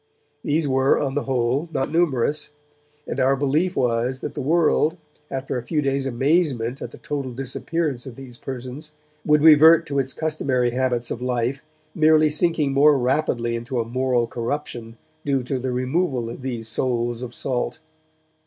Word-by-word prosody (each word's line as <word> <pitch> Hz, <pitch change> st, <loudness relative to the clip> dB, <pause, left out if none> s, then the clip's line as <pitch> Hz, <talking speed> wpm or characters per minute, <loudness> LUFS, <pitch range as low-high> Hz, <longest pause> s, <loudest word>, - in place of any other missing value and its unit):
These 150 Hz, +1 st, 0 dB
were, 135 Hz, 0 st, +3 dB
on 135 Hz, -2 st, -1 dB
the 145 Hz, -, -2 dB
whole, 130 Hz, +4 st, 0 dB
not 135 Hz, -2 st, -2 dB
numerous, 150 Hz, -3 st, +1 dB, 0.6 s
and -, -, -4 dB
our 135 Hz, +1 st, +3 dB
belief 150 Hz, +7 st, 0 dB
was 125 Hz, +1 st, 0 dB
that -, -, -5 dB
the 145 Hz, -, -4 dB
world, 160 Hz, +2 st, +2 dB, 0.3 s
after 135 Hz, -1 st, -3 dB
a -, -, -9 dB
few 150 Hz, +5 st, -1 dB
days' 135 Hz, -1 st, 0 dB
amazement 135 Hz, -2 st, 0 dB
at -, -, -5 dB
the -, -, -13 dB
total 140 Hz, -4 st, -4 dB
disappearance 135 Hz, +2 st, -2 dB
of 125 Hz, -, -8 dB
these 125 Hz, -2 st, -11 dB
persons, 135 Hz, +4 st, -7 dB, 0.3 s
would 150 Hz, 0 st, +3 dB
revert 160 Hz, +1 st, +7 dB
to 140 Hz, -3 st, -1 dB
its 135 Hz, 0 st, -1 dB
customary 135 Hz, -6 st, 0 dB
habits 125 Hz, -1 st, -1 dB
of 120 Hz, -, -4 dB
life, 125 Hz, +2 st, -1 dB, 0.3 s
merely 155 Hz, -1 st, +4 dB
sinking 155 Hz, -3 st, +1 dB
more 145 Hz, +1 st, +5 dB
rapidly 125 Hz, -3 st, 0 dB
into 120 Hz, +2 st, -3 dB
a 115 Hz, -, -1 dB
moral 125 Hz, 0 st, 0 dB
corruption 120 Hz, -1 st, -5 dB, 0.3 s
due 135 Hz, -3 st, 0 dB
to 130 Hz, +1 st, -2 dB
the 130 Hz, +1 st, -3 dB
removal 130 Hz, -1 st, -1 dB
of 120 Hz, -, -9 dB
these 120 Hz, -4 st, -4 dB
souls 120 Hz, 0 st, -1 dB
of 125 Hz, -1 st, -6 dB
salt. 125 Hz, +1 st, -2 dB
135 Hz, 165 wpm, -22 LUFS, 125-150 Hz, 0.6 s, revert